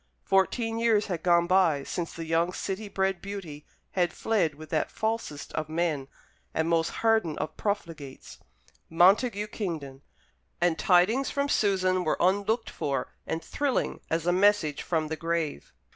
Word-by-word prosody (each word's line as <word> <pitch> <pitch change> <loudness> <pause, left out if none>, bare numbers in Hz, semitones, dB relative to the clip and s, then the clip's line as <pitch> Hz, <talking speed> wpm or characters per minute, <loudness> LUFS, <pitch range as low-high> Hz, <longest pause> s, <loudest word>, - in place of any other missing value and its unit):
Fourteen 225 +4 +1
years 225 -3 +3
had 175 -4 -3
gone 170 -1 +4
by 175 -6 +3
since 170 +4 -4
the 165 - -6
young 165 +2 +1
city 200 +3 -4
bred 190 -2 0
beauty 180 -8 -7 0.2
had 175 -2 +1
fled 195 -10 0
with 155 +1 -12
that 155 - 0
falsest 220 -10 -3
of 155 -1 -3
men, 160 -4 -1 0.5
and 160 0 +1
most 165 -1 +2 0.2
hardened 220 -9 +3
of - - -4
profligates, 165 -10 -5 0.5
Montague 200 +6 +4
Kingdon; 160 -11 -5 0.6
and 175 -2 +1
tidings 205 +9 +3
from 280 0 0
Susan 185 -5 +2
were 155 - 0
unlooked 205 +5 +1
for 140 -2 -2 0.2
and 160 0 -3
thrilling 285 - -1
as 165 0 -1
a 175 - +3
message 190 -6 +3
from 160 -3 -1
the 160 - -3
grave. 165 - -3
175 Hz, 150 wpm, -28 LUFS, 160-205 Hz, 0.6 s, gone